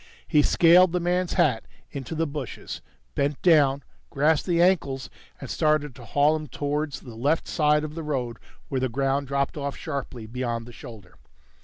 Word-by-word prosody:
He 150 - +4
scaled 175 +3 +5
the 180 - +1
man's 180 +1 0
hat 150 -11 +2 0.3
into 140 +2 -6
the 165 +1 +1
bushes, 145 -4 -6 0.3
bent 140 0 -1
down, 145 -5 +4 0.3
grasped 150 +4 +2
the 170 -2 +2
ankles 165 -7 +2 0.3
and - - -7
started 150 -2 +1
to 120 -1 -13
haul 145 +5 +3
him 155 -1 -5
towards 145 +2 -3
the 120 - -11
left 140 +8 0
side 150 0 +2
of 155 -1 -5
the 165 - -5
road 130 -6 -3 0.3
where 130 -2 -2
the 130 - 0
ground 135 +3 0
dropped 140 +2 -1
off 140 -1 -4
sharply 135 -6 -5
beyond 115 0 -3
the 120 - -12
shoulder. 105 -6 -12
145 Hz, 175 wpm, -25 LUFS, 130-155 Hz, 0.3 s, scaled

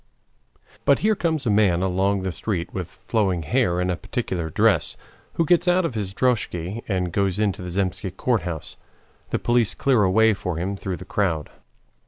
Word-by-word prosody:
But - - +4
here 220 - +5
comes 160 -7 -1
a 110 - +2
man 95 -4 +3
along 95 +1 +1
the 95 - -1
street 85 -1 -3
with 90 -3 -3
flowing 95 -5 -1
hair 90 - +1
and 90 0 0
in - - +1
a - - -4
peculiar 95 -6 -3
dress, - - +2 0.4
who 165 - +1
gets 175 +2 +3
out 180 0 +3
of 165 - -2
his 105 -4 -3
droskhy 105 -4 -1
and 90 -4 -1
goes 100 -2 +1
into 105 -3 0
the 90 - -5
Zemsky 95 +1 -2
Court 110 +4 0
house. 80 -3 -6 0.5
The - - 0
police 120 -2 +1
clear 130 -5 +3
a 95 - +3
way 110 +3 +4
for 90 -4 -4
him 95 +4 -2
through 95 -2 -4
the 95 - -10
crowd. 85 -7 -1
95 Hz, 195 wpm, -23 LUFS, 90-115 Hz, 0.5 s, here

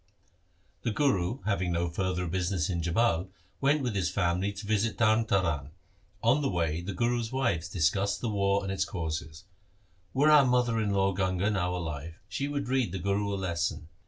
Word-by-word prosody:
The - - -1
Guru 115 -3 0
having 95 -4 0
no 85 +1 0
further 90 +1 -1
business 90 0 -1
in 85 -1 -1
Jhabal 90 +1 +1 0.3
went 140 +1 +2
with 120 -3 -1
his 95 -4 0
family 90 +1 0
to 100 +1 -8
visit 110 +1 0
Tarn 110 0 +3
Taran. 85 -9 0 0.5
On 125 +6 +4
the 140 - 0
way 85 -3 -1
the 95 +2 -5
Guru's 120 -1 0
wives 120 -11 0
discussed 95 +4 +1
the 120 - -3
war 100 -2 +1
and 95 - -3
its 95 -1 +1
causes 80 -3 -5 0.2
— 95 +1 -37
' 90 0 -37
Were 145 +3 +5
our 150 -2 +8
mother 125 -3 +2
in 105 - 0
law 100 -1 +2
Ganga 95 +2 0
now 90 -3 0
alive, 80 -2 -5
she 140 +7 -3
would 145 -2 -3
read 130 -6 +1
the 95 - -3
Guru 100 +2 0
a - - -1
lesson. 85 -3 -2
95 Hz, 190 wpm, -29 LUFS, 85-115 Hz, 0.5 s, our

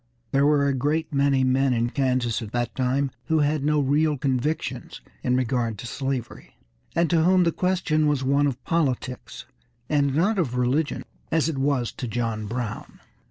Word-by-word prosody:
There 140 +1 +3
were 145 -1 +3
a 140 - +1
great 150 +5 -1
many 140 -1 +3
men 130 +1 +2
in 120 0 0
Kansas 125 -4 0
at 110 -2 -7
that 120 -2 -1
time 130 +1 0
who 160 - +1
had 145 0 +1
no 150 +1 +2
real 145 +2 +2
convictions 140 +3 -2 0.2
in 125 - +1
regard 120 -3 0
to - - -8
slavery, 130 -1 -4 0.4
and 170 0 +3
to 165 -2 +4
whom 180 +2 +4
the 170 - +2
question 170 -4 +1
was 145 -3 +1
one 140 +2 +3
of 130 -2 -4
politics, 130 -7 -2 0.4
and 140 -2 +1
not 195 +6 +2
of 130 -8 -1
religion, 130 +5 0 0.3
as 160 0 +2
it 145 -4 -3
was 135 -3 0
to 125 - -6
John 115 -2 -2
Brown. 120 -1 -5
135 Hz, 175 wpm, -24 LUFS, 125-150 Hz, 0.4 s, to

